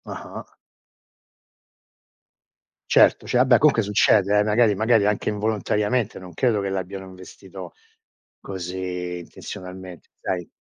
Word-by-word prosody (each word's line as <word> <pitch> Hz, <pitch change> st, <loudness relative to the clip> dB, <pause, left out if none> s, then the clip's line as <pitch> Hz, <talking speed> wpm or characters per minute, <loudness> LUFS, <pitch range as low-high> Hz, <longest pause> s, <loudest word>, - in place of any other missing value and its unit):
Ah-ah. -, -, -9 dB, 2.4 s
Certo, -, -, +4 dB
cioè -, -, 0 dB
vabbè 125 Hz, -1 st, +5 dB
comunque 140 Hz, -5 st, +4 dB
succede, 105 Hz, 0 st, +3 dB
eh, -, -, +4 dB
magari 105 Hz, 0 st, +3 dB
magari 110 Hz, 0 st, +3 dB
anche 105 Hz, 0 st, 0 dB
involontariamente, 105 Hz, +1 st, -1 dB
non 90 Hz, -1 st, -11 dB
credo 115 Hz, +3 st, +1 dB
che 100 Hz, -, -2 dB
l'abbiano 95 Hz, 0 st, -5 dB
investito 95 Hz, -1 st, -11 dB, 0.7 s
così 90 Hz, -1 st, -5 dB
intenzionalmente. 90 Hz, +1 st, -10 dB
Dai. 90 Hz, -2 st, -3 dB
100 Hz, 110 wpm, -23 LUFS, 95-110 Hz, 2.4 s, vabbè